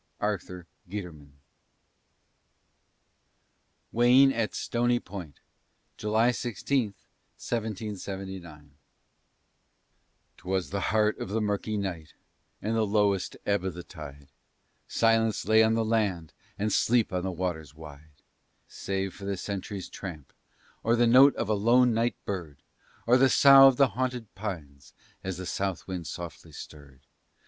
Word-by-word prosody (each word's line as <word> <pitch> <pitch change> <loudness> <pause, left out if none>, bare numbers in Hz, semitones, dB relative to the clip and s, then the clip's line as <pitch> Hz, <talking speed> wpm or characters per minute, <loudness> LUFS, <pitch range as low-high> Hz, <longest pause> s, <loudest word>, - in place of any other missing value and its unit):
ARTHUR 90 -4 -3 0.2
GUITERMAN. 85 -8 -8 2.6
WAYNE 125 +3 +5
AT 115 -2 -2
STONY 120 0 0
POINT 90 - -10 0.5
[July 110 +3 +2
16, 120 -1 -2 0.4
1779] 95 -8 -6 1.7
'Twas 95 0 -3
the 100 - -1
heart 110 0 +2
of - - -5
the 110 +3 -1
murky 105 0 -1
night, 90 -6 -5 0.5
and 110 +2 -1
the 110 - +2
lowest 100 -2 +1
ebb 100 -2 +1
of 95 -3 -3
the 90 - -7
tide, 70 -5 -11 0.6
Silence 115 -1 +2
lay 110 0 +6
on 110 0 +3
the 115 -1 0
land, 100 -8 -1 0.2
and 105 0 -1
sleep 115 -4 +2
on 90 - 0
the 95 +1 -3
waters 85 -5 -4
wide, 75 -1 -14 0.4
Save 95 -1 -4
for 100 - -10
the 100 -1 -2
sentry's 100 0 -5
tramp, 80 -8 -9 0.5
or 115 +2 +2
the 120 0 +3
note 130 +4 +7
of - - -2
a 110 - +1
lone 120 +4 +4
night 115 +2 0
bird, 80 -8 -6 0.4
Or 120 +2 +5
the 135 +1 +5
sough 135 +1 +8
of 135 -2 +3
the 140 -2 +5
haunted 125 -1 -3
pines 80 -10 -7 0.3
as 95 -2 -4
the 95 - -6
south 95 -1 -3
wind 90 -3 -5
softly 85 -4 -8
stirred. 70 -3 -12
100 Hz, 130 wpm, -28 LUFS, 90-115 Hz, 2.6 s, sough